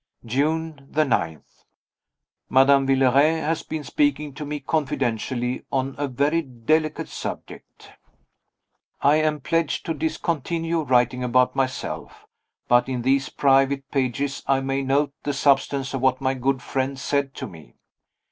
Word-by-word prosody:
June 150 +3 -1
9. 110 - +1 1.1
Madame 135 +1 +5
Villeray 135 +4 +4
has 160 +1 -1
been 155 -1 -5
speaking 145 +2 0
to 150 - -7
me 150 0 -3
confidentially 130 -4 -1
on 135 0 -1
a 145 - 0
very 145 +6 +1
delicate 155 +4 -1
subject. - - -8 1.1
I 145 +2 +5
am 155 -1 0
pledged 165 +2 -1
to 165 - -1
discontinue 165 +1 -1
writing 125 -2 +2
about 125 +1 +2
myself. 130 -1 -3 0.4
But 120 +1 +4
in 125 -2 -2
these 135 +1 +2
private 135 0 +2
pages 135 +1 -1
I 135 -1 +3
may 135 0 -1
note 140 +2 +1
the 145 - -2
substance 140 -1 +1
of 135 - -2
what 130 -1 +2
my 130 0 0
good 130 0 -1
friend 135 0 -2
said 140 0 -1
to - - -5
me. 80 -8 -13
135 Hz, 135 wpm, -23 LUFS, 130-150 Hz, 1.1 s, Madame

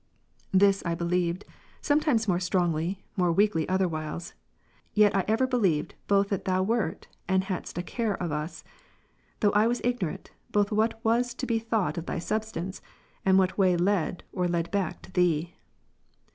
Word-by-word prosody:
8. 190 - +5
This 195 -1 +5
I 170 -1 -1
believed, 175 +2 -1 0.3
sometimes 290 -7 +2
more 180 -2 +2
strongly, 175 0 0
more 180 -3 +2
weakly 185 -3 +2
other 190 0 +2
wdiiles; 155 +1 -5 0.6
yet 210 -1 +5
I 195 - +3
ever 225 +4 +3
believed 205 - +1
both 200 0 +3
that 200 - -2
Thou 185 0 +2
wert, 215 -4 -1 0.2
and 190 0 +2
hadst 185 -3 -5
a 175 - -1
care 225 0 -1
of 175 -3 -3
us; 150 +3 -4 0.8
though 205 -3 +4
I 210 +2 +4
was 240 +1 0
ignorant, 240 -10 -2 0.2
both 205 0 +2
what 220 +1 +1
was 240 +2 +2
to 260 - -3
be 230 -3 +1
thought 220 -5 -1
of 170 - -9
Thy - - -2
substance, 190 0 -3 0.4
and 190 0 +4
what 185 +1 +2
way 185 -2 +4
led 180 -1 0
or 180 -2 0
led 170 -1 -1
back 195 -5 -2
to - - -13
Thee. 175 -1 +1
190 Hz, 170 wpm, -27 LUFS, 175-215 Hz, 0.8 s, 8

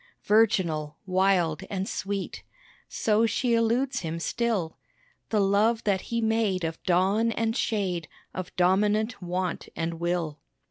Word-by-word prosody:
Virginal 170 -9 +2
wild 185 -4 +2
and 195 -1 -2
sweet 195 0 -4 0.5
So 220 +1 +2
she 235 +2 0
eludes 235 +4 +1
him 165 -1 -4
still 200 -4 -1 0.5
The 215 - +2
love 205 +4 +3
that 195 -3 +1
he 230 0 0
made 220 -5 +1
of 165 0 -3
dawn 195 +6 +2
and 225 0 -1
shade 185 - -1 0.3
Of 185 -2 -6
dominant 205 +5 +2
want 180 0 -3
and 165 0 -3
will. 170 -3 -1
195 Hz, 130 wpm, -27 LUFS, 175-225 Hz, 0.5 s, love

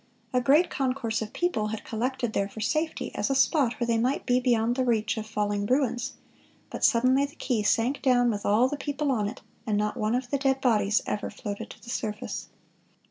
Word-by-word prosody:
A 250 - +3
great 295 +8 +4
concourse 255 -5 -1
of 215 -1 -5
people 350 -12 0
had 215 0 -5
collected 240 0 -2
there 200 0 0
for 220 - -10
safety, 310 +8 -1
as - - -1
a 270 - +1
spot 270 -3 +3
where 240 - -2
they 230 -1 +1
might 255 +4 0
be 250 -1 +3
beyond 240 -2 +2
the 260 - +1
reach 225 -3 +1
of 220 -1 -5
falling 205 -1 -1
ruins; 250 -1 0 0.6
but - - -6
suddenly 255 +3 +4
the 285 - -11
quay 240 -5 -1
sank 240 +6 +1
down 245 -3 +3
with 205 -2 -4
all 215 +5 +4
the 290 - -4
people 285 0 -2
on 215 -5 0
it, 210 - -7 0.3
and 210 -1 +1
not 210 0 -1
one 215 +2 0
of 250 0 -3
the 280 - +1
dead 270 -1 +1
bodies 215 -5 +2
ever 210 - -3
floated 205 -1 -6
to - - -13
the 235 - -7
surface." 215 -2 -4
240 Hz, 215 wpm, -27 LUFS, 215-265 Hz, 0.6 s, great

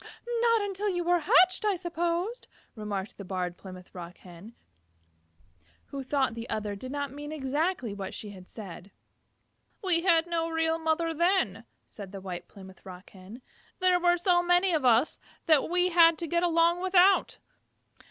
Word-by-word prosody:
"Not 460 -2 +3
until 400 +1 -3
after 385 - -1
you 350 - -1
were 350 +1 +2
hatched 365 +5 +4
I 415 -2 +1
suppose," 345 +6 -2 0.3
remarked 210 -3 -6
the - - -6
Barred 180 -2 -4
Plymouth 185 -1 -12
Rock 175 -1 -9
Hen, 185 +6 -14 1.3
who 275 - -5
thought 265 -2 0
the 230 +1 -8
other 210 -1 -3
did 255 +6 -8
not 285 -1 -3
mean 295 +1 -8
exactly 290 - -2
what 195 -1 -6
she 210 - -7
had 185 -2 -13
said. 195 -3 -10 0.9
"We 350 -3 +3
had 335 -2 +3
no 335 -1 -2
real 325 0 0
mother 325 +1 0
then," 320 - 0 0.2
said 200 -3 -11
the 200 - -7
White 180 -2 -7
Plymouth 190 -2 -14
Rock 185 -1 -12
Hen. 200 +6 -13 0.3
"There 365 -1 +3
were 350 0 +3
so 350 0 +2
many 355 +1 +2
of 300 -5 0
us 245 +5 +3 0.3
that 310 -3 +3
we 360 +1 +2
had 335 -2 +5
to 335 - -4
get 340 +2 0
along 340 0 +2
without. 375 +1 +3
315 Hz, 170 wpm, -28 LUFS, -, 1.3 s, had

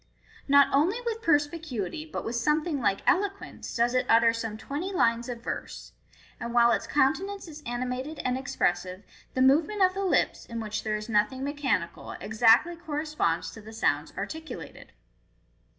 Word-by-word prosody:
Not 280 0 +7
only 340 - +3
with 455 -1 -2
perspicuity, 300 - -1
but - - -4
with 230 - -3
something 300 +5 +1
like 195 -4 +1
eloquence, 395 +1 -1
does 240 +1 +2
it 255 - +1
utter 230 0 +5
some 225 -2 -4
twenty 295 - -4
lines 235 -8 +1
of 235 -1 -6
verse; - - -6 0.5
and 235 0 -5
while 235 0 +6
its - - 0
countenance 340 +9 0
is 305 -1 -10
animated 250 +5 -3
and 255 0 +1
expressive, 185 -7 -1 0.3
the 255 - +3
movement 315 +10 +4
of 370 0 +4
the 395 +1 -3
lips, 375 - +1
in 230 0 -5
which 215 -1 -4
there 215 -1 -1
is 215 0 -5
nothing 225 +4 +1
mechanical, 275 - -2
exactly 225 - +4
corresponds 300 - -2
to 220 - -11
the 220 +1 -11
sounds 220 - 0
articulated. 320 0 -7
260 Hz, 160 wpm, -27 LUFS, 230-315 Hz, 0.5 s, Not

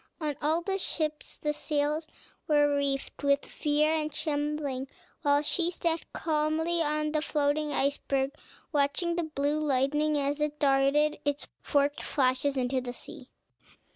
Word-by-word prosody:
On 300 -3 -2
all 315 +3 +1
the 390 +1 -1
ships 305 -4 -3
the 300 0 -1
sails 300 +1 -1 0.4
were 290 -1 +4
reefed 280 -1 -2
with 280 0 +2
fear 300 +1 +1
and 310 -1 -1
trembling, 290 -3 -2 0.3
while 290 -2 +3
she 340 +3 +1
sat 335 -2 -2
calmly 320 +2 0
on 305 0 0
the 305 0 +1
floating 300 0 0
iceberg, 275 -1 0 0.4
watching 295 +4 +1
the 345 - +1
blue 285 +2 +1
lightning, 295 +1 +1
as 285 +1 0
it 300 0 -1
darted 285 +2 +3
its 290 0 -1
forked 285 0 +1
flashes 270 0 +1
into 255 0 0
the 245 -1 -5
sea. - - -10
295 Hz, 140 wpm, -29 LUFS, 280-305 Hz, 0.4 s, were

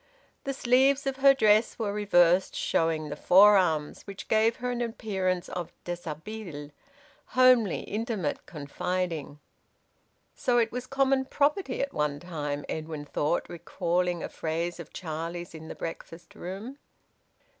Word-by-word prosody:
The 275 - -1
sleeves 265 +3 +3
of 270 -1 -2
her 275 0 +6
dress 215 -3 +3
were 210 -3 -2
reversed, 180 -3 +3
showing 160 -2 0
the 145 - -4
forearms, 180 -4 +4
which 195 -1 -8
gave 220 +1 +3
her 250 0 -3
an 245 0 -3
appearance 190 -6 -2
of 175 -2 -5
deshabille, 170 -2 -6 0.6
homely, 255 -6 +4
intimate, 210 - -3
confiding. 160 0 -3 1.0
"So 245 -1 +1
it 230 -1 +2
was 250 +1 -5
common 270 0 +2
property 285 +1 0
at 280 - -4
one 150 -1 -1
time," 150 -4 -4
Edwin 155 -2 -5
thought, 150 +3 -1
recalling 175 +1 -1
a - - -4
phrase 170 +2 -3
of 170 - -9
Charlie's 170 +1 -5
in 160 0 -9
the - - -7
breakfast 165 +1 -8
room. 205 +10 -7
185 Hz, 135 wpm, -28 LUFS, 160-235 Hz, 1.0 s, her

